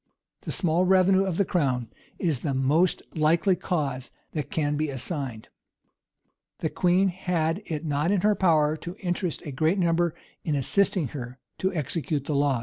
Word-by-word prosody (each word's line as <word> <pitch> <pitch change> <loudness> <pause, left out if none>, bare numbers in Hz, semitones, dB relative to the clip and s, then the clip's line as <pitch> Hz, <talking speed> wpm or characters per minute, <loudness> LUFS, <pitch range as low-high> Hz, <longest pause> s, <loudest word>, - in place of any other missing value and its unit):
The - - -5
small 175 0 +2
revenue 190 +1 +4
of 185 -3 -2
the 200 - +3
crown 130 - 0 0.3
is 160 -8 0
the 140 -4 -1
most 150 +7 +2
likely 165 +5 +3
cause 145 -7 -2 0.2
that 150 -3 -4
can 150 -2 0
be 155 +1 -1
assigned. 130 -4 -5 1.1
The 160 - -2
queen 185 +2 +3
had 175 -1 -1
it 160 0 -4
not 150 +2 0
in 200 -3 +2
her 210 +2 +4
power 155 -6 +3
to 175 +3 -7
interest 180 -3 -3
a 145 - -5
great 155 +8 +1
number 170 -2 +1 0.3
in 155 - 0
assisting 165 - +1
her 125 -2 -7 0.2
to 190 - +1
execute 150 -1 -2
the 150 - -2
laws. 140 -3 +2
160 Hz, 165 wpm, -26 LUFS, 145-180 Hz, 1.1 s, revenue